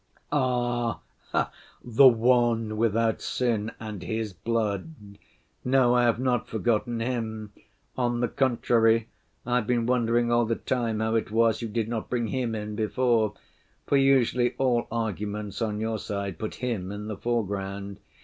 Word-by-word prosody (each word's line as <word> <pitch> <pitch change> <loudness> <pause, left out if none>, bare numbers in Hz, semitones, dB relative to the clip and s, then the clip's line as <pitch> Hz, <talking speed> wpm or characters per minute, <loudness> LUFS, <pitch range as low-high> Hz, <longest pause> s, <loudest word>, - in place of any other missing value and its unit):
" - - -35
"Ah! 120 -4 0 0.8
the 125 +3 +6
One 120 -2 +3
without 115 0 +1
sin 115 -3 -1
and 105 -4 -6
His 110 -1 -3
blood! 115 - -2 0.7
No, 125 -1 +4
I 120 0 +4
have 115 -2 +3
not 125 -2 0
forgotten 115 +1 0
Him; 110 -3 -3 0.4
on 120 -1 0
the 120 - +1
contrary 115 -3 +2 0.4
I've 120 -2 0
been 120 -2 +1
wondering 120 -1 +2
all 120 0 +3
the 115 - +1
time 115 -4 -1
how 110 0 0
it 115 - 0
was 115 +1 +2
you 115 - -3
did 110 0 -2
not 115 -1 -4
bring 120 -3 -1
Him 125 -4 -1
in 105 0 -5
before, 110 -1 +1 0.5
for - - +1
usually 125 -3 +3
all 125 -3 +1
arguments 105 -2 -3
on 105 -2 -1
your 110 0 -2
side 100 -5 -4
put 110 - -4
Him 115 -7 -3
in 105 +1 -6
the 110 0 -4
foreground. 100 -3 -3
115 Hz, 150 wpm, -26 LUFS, 110-120 Hz, 0.8 s, the